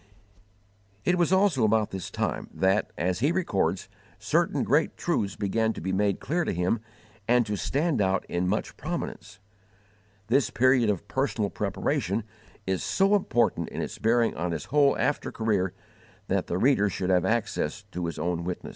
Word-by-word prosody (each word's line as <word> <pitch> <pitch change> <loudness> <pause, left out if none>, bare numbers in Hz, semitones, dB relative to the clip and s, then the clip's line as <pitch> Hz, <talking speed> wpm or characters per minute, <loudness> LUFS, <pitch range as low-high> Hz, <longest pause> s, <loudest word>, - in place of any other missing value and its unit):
It 180 - +3
was 175 -1 +1
also 190 - +3
about 110 -1 +2
this 95 -3 -5
time - - -3
that, 95 +2 +2
as 90 +1 0
he 140 +7 +2
records, 170 - 0 0.3
certain - - +1
great - - +1
truths 100 -2 -1
began 110 +2 0
to - - -8
be 95 +3 -2
made 100 0 +1
clear 170 +5 -1
to - - -1
him 90 +6 0 0.5
and 120 0 +4
to 105 -1 -2
stand 145 - 0
out 95 -1 +1
in 90 +1 -1
much 105 +4 -2
prominence. - - -5 0.9
This 120 +2 +2
period 130 -2 +3
of 100 0 -2
personal 120 -6 -1
preparation 100 +5 -1 0.4
is 95 -1 -1
so 195 +1 +2
important 120 - +1
in - - -6
its - - -6
bearing 115 +1 +2
on 85 +1 -2
his 80 - -4
whole 145 0 +3
after 145 - 0
career 105 -5 0 0.6
that - - 0
the 85 - -1
reader 110 -2 +3
should 95 0 -2
have 90 -1 +3
access 105 -5 -1
to 90 -1 -3
his 85 - -5
own 85 -1 -1
witness. 90 +1 -5
105 Hz, 170 wpm, -27 LUFS, 95-130 Hz, 0.9 s, and